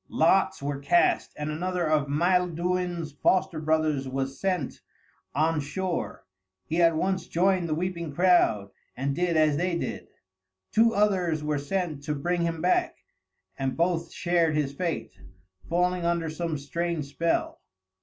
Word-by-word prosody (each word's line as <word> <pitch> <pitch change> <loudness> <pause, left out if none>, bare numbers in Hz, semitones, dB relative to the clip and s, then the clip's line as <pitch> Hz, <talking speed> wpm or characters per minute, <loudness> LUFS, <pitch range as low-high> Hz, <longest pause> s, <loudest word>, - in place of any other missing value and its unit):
Lots 170 -2 +2
were 140 -1 -2
cast, 140 +5 +2
and 150 +1 -3
another 175 +2 -1
of 155 -2 +2
Maelduin's 175 +1 0
foster 175 +3 +1
brothers 155 -3 +1
was 135 +1 -3
sent 180 -8 -2 0.5
on 155 +2 +2
shore. 175 - -3 0.4
He 165 +2 0
at 165 -1 +5
once 185 +1 -1
joined 180 0 +1
the 155 - +1
weeping 170 -2 -3
crowd, 140 - +3 0.3
and 135 +2 -1
did 175 -1 +1
as 155 -2 +3
they 175 +1 0
did. - - -5 0.6
Two 230 +1 +4
others 185 -7 +1
were 150 -1 0
sent 155 0 -2
to 150 -1 -1
bring 175 +5 -1
him 165 -1 -2
back, 180 - +2 0.6
and 135 -1 -2
both 170 -1 0
shared 170 -3 +1
his 145 -2 0
fate, 170 +2 -3 0.6
falling 180 +1 +1
under 170 -2 0
some 165 -1 -3
strange 165 +2 -3
spell. 165 +4 -1
165 Hz, 145 wpm, -27 LUFS, 150-180 Hz, 0.6 s, at